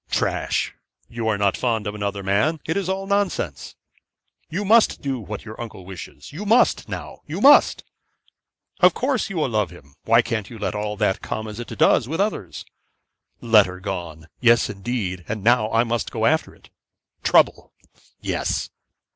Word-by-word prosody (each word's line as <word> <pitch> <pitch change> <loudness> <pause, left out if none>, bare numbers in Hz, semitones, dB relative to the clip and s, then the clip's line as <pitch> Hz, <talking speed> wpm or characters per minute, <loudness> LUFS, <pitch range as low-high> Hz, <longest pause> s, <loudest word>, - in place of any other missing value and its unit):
'Trash - - -1 0.4
you 115 -1 -4
are 110 -2 +1
not 100 -1 +2
fond 115 -4 -1
of 105 - -3
another 100 -1 -3
man. 105 +12 +1
It 160 - -1
is 195 -2 -1
all 190 +1 -2
nonsense.' 195 - -2 0.7
'You 200 +6 -3
must 225 +3 +4
do 135 -2 -2
what 105 0 -7
your 110 +1 -8
uncle 105 -6 -8
wishes. 90 - -10
You 180 +7 -6
must, 225 +4 +3
now! - - -7
you - - -4
must! - - +6 1.0
Of 180 -1 +5
course, 255 -3 0
you 195 - -6
will 150 -4 +1
love 105 -5 0
him. 75 -5 -16
Why 115 +1 +5
can't 115 -4 -3
you 120 - -9
let 105 - -2
all 105 0 -3
that 105 -3 0
come 110 0 -4
as 105 +1 -8
it 120 - -6
does 115 - +3
with 165 +3 -3
others?' 195 - -2 0.8
'Letter 105 -6 +4
gone; 85 -5 -6
yes 120 -3 +4
indeed, 100 -4 -4
and 105 -2 -4
now 115 -1 +3
I 115 +1 +3
must 120 -1 -2
go - - -1
after - - +1
it.' - - -22 0.5
'Trouble! - - +3 0.5
yes! - - -2
110 Hz, 170 wpm, -22 LUFS, 100-140 Hz, 1.0 s, must